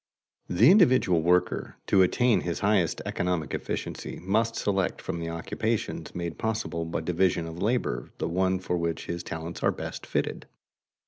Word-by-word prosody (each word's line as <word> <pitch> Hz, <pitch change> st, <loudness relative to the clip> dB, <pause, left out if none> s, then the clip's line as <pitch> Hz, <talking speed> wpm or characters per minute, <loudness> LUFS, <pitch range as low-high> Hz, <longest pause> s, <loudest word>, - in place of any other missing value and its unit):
_The 100 Hz, +8 st, +5 dB
individual 130 Hz, -, +5 dB
worker, 90 Hz, +2 st, +1 dB
to 95 Hz, -, +4 dB
attain 120 Hz, +6 st, +3 dB
his 85 Hz, -2 st, -3 dB
highest 100 Hz, -5 st, +2 dB
economic 85 Hz, -5 st, -1 dB
efficiency, -, -, -4 dB
must 110 Hz, +5 st, +1 dB
select 95 Hz, -2 st, 0 dB
from 85 Hz, -, -4 dB
the 85 Hz, 0 st, -3 dB
occupations 105 Hz, +7 st, -3 dB
made 85 Hz, -2 st, -4 dB
possible 110 Hz, -7 st, -2 dB
by 80 Hz, -, -3 dB
division 90 Hz, 0 st, +1 dB
of 80 Hz, +1 st, -7 dB
labor 105 Hz, -, 0 dB
the -, -, -2 dB
one 95 Hz, +2 st, +1 dB
for 90 Hz, -1 st, -2 dB
which 85 Hz, -2 st, -2 dB
his 85 Hz, 0 st, -4 dB
talents 80 Hz, +1 st, -6 dB
are -, -, +3 dB
best -, -, -6 dB
fitted. -, -, -2 dB
90 Hz, 155 wpm, -27 LUFS, 85-105 Hz, -, The